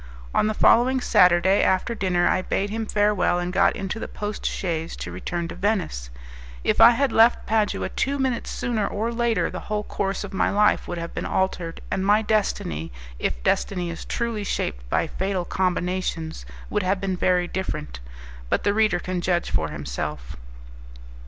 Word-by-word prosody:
On - - +3
the 215 - -1
following 255 +5 +4
Saturday, 180 -3 +4
after 190 +5 +1
dinner, 180 -5 +1
I 185 - +2
bade 200 +2 -1
him 225 0 -3
farewell, 205 -4 +2
and 175 +1 -3
got 195 +1 +3
into 195 +3 -4
the - - -5
post 210 0 -5
chaise 165 -3 -3
to 85 - -6
return 170 - -4
to - - -5
Venice. 180 - -1 0.5
If - - +2
I - - +11
had 260 +3 +2
left 230 +2 +4
Padua 215 -1 0
two 280 +1 -1
minutes 265 -3 -1
sooner 220 -4 -1
or 225 +3 -2
later, 235 -1 +1
the - - -5
whole 210 0 -1
course 195 -1 -2
of 200 - -8
my 190 - +2
life 210 +1 +2
would 175 - -4
have 170 0 -5
been - - -3
altered, 180 -3 -2
and 190 - 0
my 210 +2 +4
destiny, 85 - -1 0.3
if - - -2
destiny 180 - 0
is 165 - -7
truly 235 -3 -2
shaped - - -3
by - - +1
fatal 190 -2 -2
combinations, 180 -3 -2 0.2
would 210 - +1
have 190 +1 0
been 190 -1 -1
very 180 0 +2
different. 155 - -4 0.5
But - - +1
the 205 - +2
reader 215 -4 +3
can 180 0 -3
judge 175 -1 0
for 80 -1 0
himself. 70 -1 -5
190 Hz, 180 wpm, -24 LUFS, 175-210 Hz, 0.5 s, I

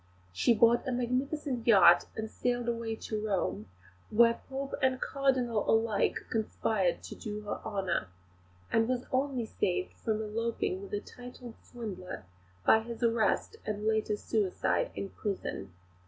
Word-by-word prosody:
She 235 - +3
bought 235 +3 +4
a - - 0
magnificent 250 +1 -1
yacht 190 -6 +7
and 220 0 -3
sailed 245 +1 -1
away 230 -1 -1
to 215 -1 -4
Rome, 190 - -1 0.4
where 230 +1 +4
Pope 275 +1 -4
and 260 -1 +2
Cardinal 255 -6 +1
alike 225 -2 +2
conspired 215 -4 0
to - - -7
do 210 -1 -6
her 210 - -4
honour; 190 - -1 0.6
and 225 0 +3
was 250 0 -1
only 260 -2 0
saved 90 - -1
from 215 - -2
eloping 220 -3 -2
with 200 - -9
a 205 - -2
titled 245 -1 -10
swindler 190 - -7 0.4
by 220 - +7
his 230 +1 -6
arrest 230 - +1
and 210 0 -3
later 220 -1 +1
suicide 205 -3 0
in 195 - -4
prison. 185 - -4
225 Hz, 140 wpm, -31 LUFS, 205-245 Hz, 0.6 s, yacht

